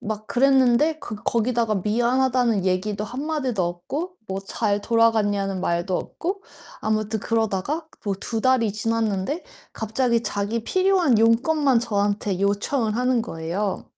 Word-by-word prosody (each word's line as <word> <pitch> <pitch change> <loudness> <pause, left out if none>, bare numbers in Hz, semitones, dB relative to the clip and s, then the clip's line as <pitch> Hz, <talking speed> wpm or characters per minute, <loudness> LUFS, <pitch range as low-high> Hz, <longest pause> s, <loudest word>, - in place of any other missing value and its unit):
막 215 0 -5
그랬는데 270 +4 +3
그 215 - -6
거기다가 230 -2 +1
"미안하다."는 240 +1 +1
얘기도 200 +3 -1
한마디도 260 -2 -2
없고 275 - -4
뭐 190 -1 -3
"잘 205 +1 -1
돌아갔냐?"는 205 -4 +2
말도 175 +1 0
없고 390 +4 -4 0.4
아무튼 215 0 -1
그러다가 225 - -1 0.2
뭐 200 -2 0
2 225 -2 -2
달이 230 -4 +2
지났는데 225 - -1 0.3
갑자기 230 +1 0
자기 215 +2 -2
필요한 370 - +3
용건만 255 +4 +3
저한테 205 -3 -1
요청을 210 +3 0
하는 250 0 +2
거예요. 180 +1 -3
225 Hz, 305 characters per minute, -23 LUFS, 205-255 Hz, 0.4 s, 그랬는데